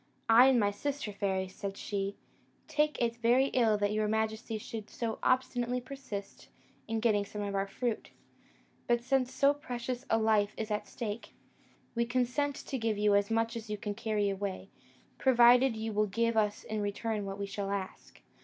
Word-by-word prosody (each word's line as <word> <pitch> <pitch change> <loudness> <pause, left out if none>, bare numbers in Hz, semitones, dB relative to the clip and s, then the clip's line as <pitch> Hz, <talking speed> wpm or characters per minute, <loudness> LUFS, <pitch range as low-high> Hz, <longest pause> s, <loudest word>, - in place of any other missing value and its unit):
'I 235 +3 +8
and 260 -2 +5
my 205 -2 +2
sister 275 +1 -3
fairies,' 190 -2 -1
said 200 0 -5
she, 200 -1 -3 0.5
'take 300 0 +1
it 235 -1 0
very 245 +4 +3
ill 225 -4 +3
that 205 0 +1
your 215 0 +1
majesty 220 +1 -1
should 215 0 -7
so 225 -2 -3
obstinately 250 -1 +1
persist 245 -6 -8 0.4
in 225 0 -1
getting 215 -3 +2
some 205 +1 -6
of 200 -1 -3
our 195 0 0
fruit; 230 +3 -3 0.8
but 240 0 +2
since 260 0 +1
so 280 +1 +4
precious 250 -2 -5
a 225 - +4
life 215 -2 +2
is 220 -1 -4
at 210 0 -2
stake, 215 +1 -6 0.6
we 235 0 +1
consent 255 +4 0
to 270 -3 -5
give 225 -2 0
you 210 0 +3
as 200 0 +3
much 225 +1 0
as 225 -1 -6
you 210 - -2
can 205 -1 -4
carry 215 -1 0
away, 195 -1 -4 0.5
provided 245 -1 +6
you 220 0 -3
will 210 +1 +2
give 230 +3 0
us 210 -1 +1
in 215 -1 -3
return 205 +1 -2
what 195 0 -5
we 200 - -3
shall 200 0 -4
ask.' 195 -1 -6
220 Hz, 180 wpm, -31 LUFS, 205-245 Hz, 0.8 s, I